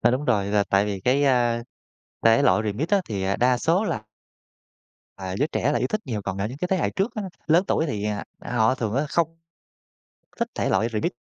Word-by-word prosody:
A, - - +4
đúng 130 +4 -1
rồi, 105 -7 +2
là 100 0 +2
tại 100 +1 +2
vì 100 -2 -3
cái, 130 +7 +2
a, 120 -3 +2 0.6
thể 115 +3 +6
loại 110 -6 +3
Remix 110 +9 -2
á, 200 -1 +3
thì, 100 -3 -3
à, 95 +1 +1
đa 125 0 +3
số 170 - +2
là 110 - -2 1.1
à, 95 -1 -5
giới 145 +7 +1
trẻ 145 - +1
là - - +1
yêu - - 0
thích 215 - -1
nhiều, 110 -6 -3
còn 95 0 -4
ở 100 - 0
những 125 +5 -7
cái 180 - -2
thế 190 - +2
hệ 180 - 0
trước 205 +5 -1
á, 215 - -3 0.2
lớn 165 +4 +4
tuổi 160 - +1
thì, 105 -8 -3 0.3
à, - - -8
họ 110 +2 +4
thường 110 -4 -3
á, 140 +3 +1
không 165 +1 0 1.0
thích - - 0
thể - - 0
loại 100 +4 +2
Remix 105 -1 -1
120 Hz, 235 wpm, -24 LUFS, 105-150 Hz, 1.1 s, thể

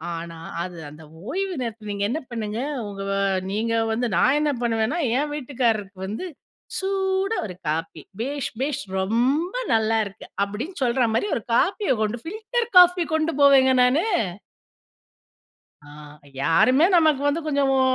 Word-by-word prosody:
ஆனா 165 0 -7 0.2
அது 175 0 -6
அந்த 150 +2 -12 0.2
ஓய்வு 385 +4 -2
நேரத்தை 230 -2 -5
நீங்க 200 0 -2
என்ன 285 +7 -1
பண்ணுங்க, 220 -1 -4 0.3
ஒங்க 195 -1 -6
வ - - 0 0.4
நீங்க 225 +3 -1 0.2
வந்து 240 +2 0
நான் 265 +4 +4
என்ன 300 -1 +1
பண்ணுவேன்னா, 230 +5 0 0.2
என் 295 +2 -1
வீட்டுக்காரருக்கு 235 -8 -1
வந்து, 215 - -5 0.5
சூடா 385 +1 0
ஒரு 185 -4 -7
காப்பி, 160 +2 -3 0.2
"பேஷ் 280 +2 -3
பேஷ், 275 0 -1 0.2
ரொம்ப 255 - 0 0.2
நல்லா 225 0 +2
இருக்கு" 200 -1 -10 0.2
அப்படின்னு 235 - -6
சொல்ற 245 +1 +2
மாரி 315 - +1
ஒரு - - -3
காப்பிய 390 - +2
கொண்டு 215 +2 -1
ஃபில்டர் 435 +6 -3
காஃபி 360 -1 +7
கொண்டு 315 +1 +1
போவேங்க 270 -2 +6
நானு. 265 +9 +3 1.8
ஆ. - - -17 0.6
யாருமே 255 - +4
நமக்கு 310 -4 +3
வந்து 295 +3 0
கொஞ்சம், 280 -2 +1
ஒ - - +3
255 Hz, 145 wpm, -23 LUFS, 215-320 Hz, 1.8 s, காஃபி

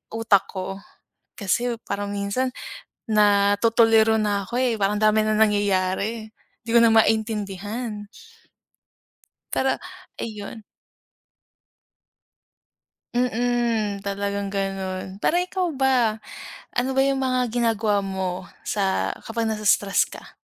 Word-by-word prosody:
utak 225 -4 +3
ko, 195 0 -5 0.6
kasi 235 +4 0
parang 200 0 -4
minsan 200 +6 -1 0.6
natutuliro 220 +2 +4
na 205 -1 0
ako, 235 - -9
eh, 245 -2 +2
parang 205 +1 +1
dami 215 0 +4
ng 215 - +1
nangyayari, 205 +1 +1 0.3
'di 230 - -6
ko 235 - +7
na 230 -1 +5
maintindihan. 215 0 0 1.5
Pero, 265 - +1 0.4
ayun. 215 0 -7 2.5
Mm, 235 -4 0
talagang 200 0 -3
gano'n 190 -1 -3
parang 345 - +1
ikaw 365 -1 -2
ba, 255 -5 +2 0.6
ano 245 +2 +1
ba - - +5
yung 275 0 +1
mga 255 -2 +1
ginagawa 220 -4 +1
mo 190 -1 -3 0.2
sa 195 -2 0
kapag 225 0 -2
na-i-stress 210 -2 +2
ka? - - -12
215 Hz, 105 wpm, -23 LUFS, 200-235 Hz, 2.5 s, ko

